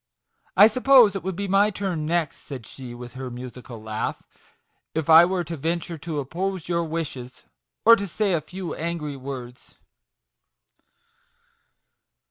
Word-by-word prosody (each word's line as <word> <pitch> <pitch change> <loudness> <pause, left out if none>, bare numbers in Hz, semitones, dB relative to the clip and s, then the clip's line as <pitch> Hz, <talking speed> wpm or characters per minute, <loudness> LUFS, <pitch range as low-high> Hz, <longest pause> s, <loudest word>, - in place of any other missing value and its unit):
I 200 - +10
suppose 245 -2 +6
it 195 - -2
would 190 0 -4
be 200 +2 -3
my 200 +2 +4
turn 185 -6 -3
next," 170 -3 0
said 130 -6 -7
she, 125 -3 -9
with 120 0 -10
her 130 -1 -6
musical 125 -1 -9
laugh, 110 0 -4 0.4
" - - -46 0.3
if 160 0 0
I 165 +2 +10
were 180 0 -1
to 170 0 -5
venture 165 +2 -3
to 160 -1 -4
oppose 175 +5 -3
your 170 -1 0
wishes, 155 -6 -5 0.4
or 230 +1 +10
to 200 -2 -4
say 200 +2 0
a 165 - +1
few 180 +3 -6
angry 160 -3 -4
words." 130 -2 -9
165 Hz, 150 wpm, -24 LUFS, 135-190 Hz, 0.4 s, I